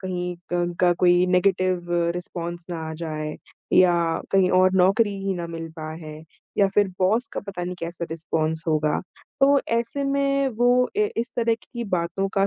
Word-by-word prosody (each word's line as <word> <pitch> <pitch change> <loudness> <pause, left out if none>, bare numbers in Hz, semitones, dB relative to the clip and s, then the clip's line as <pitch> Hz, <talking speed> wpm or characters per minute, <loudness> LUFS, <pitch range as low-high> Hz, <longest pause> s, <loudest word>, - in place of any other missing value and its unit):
कहीं 180 -1 -3 0.2
क - - +1
उनका 175 0 +2
कोई 175 0 +5
नेगेटिव 180 -1 +1 0.3
रिस्पॉन्स 175 -1 -6
ना 170 - -3
आ - - -5
जाए 155 -1 -3 0.4
या 180 -1 +6 0.4
कहीं 190 -1 +4
और 185 0 +4
नौकरी 200 +3 +3
ही 195 - 0
ना 175 -1 -4
मिल 165 -1 -6
पा 155 -1 -6
है 155 0 -8 0.4
या 200 -1 +5
फिर 205 -1 +4
बॉस 220 +8 +2
का - - -3
पता 195 -3 -6
नहीं 180 +1 -4
कैसा 170 0 -4
रिस्पॉन्स 160 -1 -1
होगा। 155 -1 +1 0.4
तो 280 0 +5 0.2
ऐसे 240 +4 -3
में 275 0 +1
वो 245 +1 +4
ए 425 0 +2
इस 235 +1 -2
तरह 230 -1 +2 0.2
की 235 -1 -4
बातों 190 0 -1
का 195 0 +2
180 Hz, 180 wpm, -24 LUFS, 170-220 Hz, 0.4 s, या